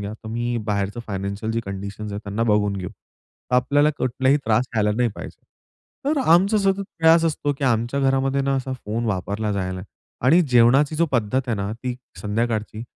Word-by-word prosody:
घ्या, 100 +1 -5
तर 110 0 -10
मी 120 +1 -2
बाहेरचं 105 +2 -1
फायनान्शियल 100 +2 -3
जे 115 - 0
कंडिशन्स 100 +2 -6
आहेत, 100 - -4
त्यांना 105 +2 -2
बघून 105 -2 +2
घेऊ, 90 -2 -4
तर 125 - -11
आपल्याला 145 +4 +3
कुठलाही 130 +2 +2
त्रास 115 +3 +2
झाला 105 -2 +2
नाही 125 0 +2
पाहिजे." - - -9 0.6
तर 295 +2 +1
आमचा 195 +5 +4
सतत 195 0 +1 0.2
प्रयास 165 0 +5
असतो 150 -2 0
की 140 - -2
आमच्या 120 +2 +1
घरामध्ये 135 0 +1
ना 135 0 0
असा 130 0 -3
फोन 110 +3 -2
वापरला 105 +2 -2
जायला 95 -2 -3 0.4
आणि 165 +7 +6
जेवणाची 135 +3 +4 0.2
पद्धत 120 +1 +1
आहे 120 - 0
ना, 100 +1 -3
ती 125 +2 -4 0.3
संध्याकाळची, 110 0 -2
115 Hz, 175 wpm, -22 LUFS, 105-135 Hz, 0.6 s, आणि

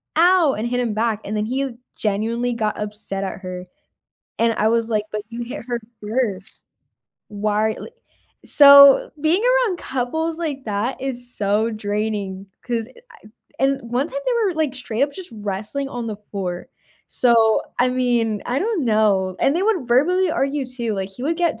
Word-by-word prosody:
"Ow!" 345 -3 +5
and 220 - -3
hit 245 0 -1
him 235 -3 -1
back, 220 0 0
and 210 - -3
then 210 - 0
he 260 +1 -2 0.2
genuinely 230 +4 -1
got 215 -3 -2
upset 210 -2 -4
at 190 - -5
her, 185 -1 -6 0.7
and 230 0 +3
I 215 - +2
was 230 0 +1
like, 215 -2 0
"But 210 0 -3
you 235 0 -6
hit 235 0 -7
her 240 -1 -2 0.2
1st," 210 -3 -3 0.6
why 210 +1 0
li - - -8 0.6
so, 280 -1 +8
being 335 +7 +2
around - - +2
couples 320 +6 -2
like 290 -5 -4
that 210 +5 -2
is 245 -2 -5
so 210 +3 +1
draining, 205 -2 -3 0.2
'cause 235 -2 -2
eh, 475 - -17 0.6
I - - +3
and 275 0 +1
one 265 +5 +1
time - - -4
they - - +2
were, 370 - -1
like, 310 -4 -1
straight 250 -2 -3
up 285 0 +1
just 370 +3 -9
wrestling 210 +6 -4
on 245 -3 -5
the 215 - -4 0.2
floor, 180 -3 -4 0.4
so, 230 -3 +4 0.2
I 250 - +4
mean, 240 -4 0
I 245 +2 0
don't 390 - -1
know, 200 -4 +2
and 275 - +3
they 370 - 0
would 395 - +1
verbally 345 +9 +3
argue 275 -2 -1
too, 240 -3 -3
like, 195 -1 -4
he 220 +6 -11
would 320 +4 0
get 335 -9 0
235 Hz, 180 wpm, -21 LUFS, 210-275 Hz, 0.7 s, so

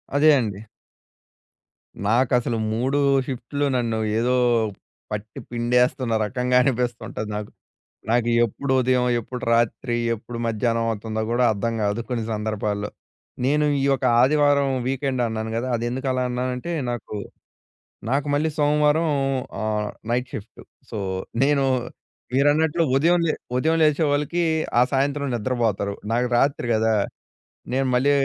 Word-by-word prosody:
అదే 155 +2 +5
అండి. 105 -4 -3 1.5
నాకు 120 +3 +2
అసలు 115 -1 -2 0.2
3 130 +5 0 0.3
షిఫ్ట్‌లు 140 +3 -3
నన్ను 115 -2 0 0.2
ఏదో, 125 +2 +2 0.8
పట్టి 105 0 -5
పిండేస్తున్న 125 +1 +1
రకంగా 125 +2 -1
అనిపిస్తుంటది 120 -4 -2
నాకు. 105 -1 -5 0.6
నాకు 120 0 +2 0.2
ఎప్పుడు 130 +5 -3
ఉదయం, 125 0 +2
ఎప్పుడు 125 +2 -7
రాత్రి, 120 +1 +1 0.2
ఎప్పుడు 115 +2 -8
మధ్యాహ్నం 115 +1 0
అవుతుందో 110 +1 -3
కూడా 125 +1 +2
అర్థం 115 +3 -2
కాదు 105 +3 0
కొన్ని 120 -3 -1
సందర్భాల్లో. 105 -1 -2 0.6
నేను 150 +2 +2 0.2
ఈ - - 0
యొక్క 135 -1 +1 0.2
ఆదివారం 145 0 +3 0.2
వీకెండ్ 135 -1 -1
అన్నాను 110 0 -3
కదా! 125 +2 -2
అది 115 - -3
ఎందుకు 130 +2 -3
అలా 130 0 0
అన్నానంటే 125 +5 -3 0.2
నాకు, 115 -2 -6 0.9
నాకు 140 +2 0
మళ్ళీ 155 +2 +1
సోమవారం 150 +2 +3 0.5
ఆహ్, 105 -1 -1 0.2
నైట్ 125 +1 0
షిఫ్టు 105 +1 -8 0.3
సో, - - -5 0.5
నేను 140 -1 +3 0.7
మీరన్నట్లు 150 +4 +3
ఉదయం 170 +5 +4
లే 155 - +1 0.2
ఉదయం 160 +6 +2
లేచే 155 +1 +3
వాళ్ళకి, 150 +4 0 0.4
ఆ - - +6
సాయంత్రం 140 +1 0
నిద్రపోతారు. 110 -4 -1 0.2
నాకు 125 +2 +1
రాత్రి 135 -2 +1
కదా! 110 0 +2 0.8
నేను 135 0 +1
మళ్ళీ 130 +3 +3
125 Hz, 125 wpm, -23 LUFS, 115-140 Hz, 1.5 s, ఆ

